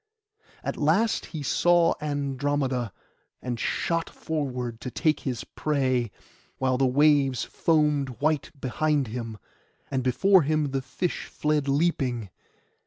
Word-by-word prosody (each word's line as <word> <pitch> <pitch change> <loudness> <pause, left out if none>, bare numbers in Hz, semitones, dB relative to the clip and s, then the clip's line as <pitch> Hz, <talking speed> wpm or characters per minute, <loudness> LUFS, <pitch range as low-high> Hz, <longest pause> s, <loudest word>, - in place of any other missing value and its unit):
At - - -3
last 180 +10 +2
he 155 -4 -6
saw 175 +4 +4
Andromeda, 140 -4 -1 0.5
and 120 -2 -4
shot 165 -1 -1
forward 125 -7 -4
to 125 - -4
take 155 +4 +1
his 125 -4 -3
prey, 130 -6 0 0.5
while 130 -1 +1
the 135 - +4
waves 140 -1 +3
foamed 150 -5 +1
white 150 -1 +1
behind 140 0 0
him, 115 -1 -5 0.5
and 130 - 0
before 185 +10 +4
him 150 -1 0
the 135 0 -1
fish 165 +7 -3
fled 150 -2 0
leaping. 135 - 0
140 Hz, 120 wpm, -26 LUFS, 125-155 Hz, 0.5 s, saw